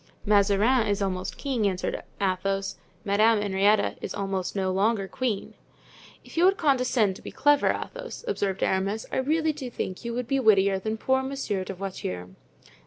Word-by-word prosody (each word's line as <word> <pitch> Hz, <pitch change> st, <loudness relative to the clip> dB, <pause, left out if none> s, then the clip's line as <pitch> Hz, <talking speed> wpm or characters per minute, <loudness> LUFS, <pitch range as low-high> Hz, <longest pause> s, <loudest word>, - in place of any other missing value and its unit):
"Mazarin 210 Hz, +4 st, +3 dB
is 205 Hz, -1 st, 0 dB
almost 185 Hz, -2 st, -2 dB
king," 250 Hz, -7 st, 0 dB
answered 185 Hz, -2 st, -2 dB, 0.2 s
Athos; 195 Hz, 0 st, -1 dB, 0.3 s
"Madame 215 Hz, +2 st, +4 dB
Henrietta 205 Hz, +1 st, +2 dB
is -, -, -5 dB
almost 195 Hz, -2 st, -2 dB
no 190 Hz, -1 st, 0 dB
longer 200 Hz, +1 st, +1 dB
queen." 225 Hz, -2 st, -3 dB, 0.7 s
"If -, -, -13 dB
you 345 Hz, -, +5 dB
would 390 Hz, +1 st, +4 dB
condescend 250 Hz, -, +2 dB
to -, -, -15 dB
be -, -, -7 dB
clever, 290 Hz, 0 st, +3 dB
Athos," -, -, -6 dB
observed 200 Hz, -, -1 dB
Aramis, 195 Hz, +3 st, 0 dB
"I -, -, -1 dB
really 310 Hz, +4 st, +1 dB
do 275 Hz, -4 st, -6 dB
think 190 Hz, -4 st, -5 dB
you 235 Hz, 0 st, -4 dB
would 250 Hz, -1 st, -3 dB
be 275 Hz, +2 st, +1 dB
wittier 200 Hz, -5 st, +4 dB
than 220 Hz, +3 st, -3 dB
poor 265 Hz, +4 st, +1 dB
Monsieur 265 Hz, -8 st, -3 dB
de 190 Hz, +1 st, -6 dB
Voiture." 90 Hz, -, -5 dB
210 Hz, 170 wpm, -26 LUFS, 195-255 Hz, 0.7 s, you